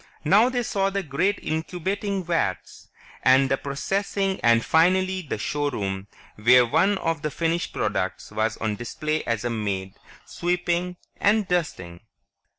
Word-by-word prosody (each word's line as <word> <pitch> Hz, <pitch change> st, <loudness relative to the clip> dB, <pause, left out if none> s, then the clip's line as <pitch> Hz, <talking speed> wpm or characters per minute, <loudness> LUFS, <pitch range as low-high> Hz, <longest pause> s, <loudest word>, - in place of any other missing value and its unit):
Now 205 Hz, +10 st, +5 dB
they 245 Hz, -1 st, -1 dB
saw 195 Hz, -3 st, 0 dB
the 195 Hz, 0 st, -2 dB
great 180 Hz, +7 st, 0 dB
incubating 185 Hz, +5 st, -2 dB
vats, 165 Hz, -, -2 dB, 0.3 s
and 130 Hz, +1 st, +4 dB
the 135 Hz, -, +3 dB
processing 195 Hz, +8 st, -2 dB
and 115 Hz, -1 st, +4 dB
finally 185 Hz, +3 st, +3 dB
the 145 Hz, -9 st, -4 dB
showroom 105 Hz, -8 st, -2 dB, 0.3 s
where 125 Hz, +3 st, +6 dB
one 195 Hz, -, +2 dB
of 165 Hz, -4 st, -2 dB
the 150 Hz, -, -1 dB
finished 165 Hz, +3 st, -1 dB
products -, -, -2 dB
was 110 Hz, +1 st, -1 dB
on 110 Hz, -2 st, -2 dB
display 155 Hz, +7 st, -3 dB
as 115 Hz, -1 st, -1 dB
a 120 Hz, -, 0 dB
maid, 100 Hz, -4 st, -3 dB, 0.3 s
sweeping 180 Hz, 0 st, -1 dB, 0.2 s
and 210 Hz, 0 st, +2 dB
dusting. 90 Hz, -, -2 dB
160 Hz, 140 wpm, -24 LUFS, 120-190 Hz, 0.3 s, where